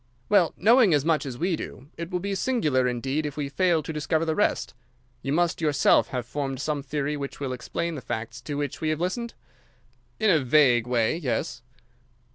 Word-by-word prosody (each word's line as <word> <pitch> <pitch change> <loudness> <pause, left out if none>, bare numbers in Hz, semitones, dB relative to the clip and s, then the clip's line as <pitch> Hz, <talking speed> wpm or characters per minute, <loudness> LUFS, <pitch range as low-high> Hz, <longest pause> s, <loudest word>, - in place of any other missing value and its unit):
"Well, 200 -5 +4
knowing 220 - +5
as 145 0 0
much 160 -3 +1
as 125 -2 -6
we 175 +3 0
do, 135 -3 -8
it 170 0 -6
will 180 -1 -1
be 200 +2 -3
singular 170 - +1
indeed 130 +5 -1
if 150 -1 -5
we 145 -2 -2
fail 170 +1 +2
to 160 - -5
discover 155 +2 0
the 160 - 0
rest. 205 - 0 0.5
You 135 - -3
must 170 +2 +1
yourself 150 -3 +4
have 125 -2 -4
formed 135 0 -3
some 145 0 -2
theory 145 +1 -2
which 140 -1 -6
will 135 -2 -3
explain 170 +6 -3
the 145 - -6
facts 115 +1 -5
to 145 +3 -5
which 145 -2 -3
we 155 - 0
have 155 0 -1
listened." 230 +7 -3 0.8
"In 220 -2 +4
a 160 - +4
vague 125 -3 +4
way, 120 +3 +1
yes." 145 -8 -2
150 Hz, 200 wpm, -26 LUFS, 135-170 Hz, 0.8 s, knowing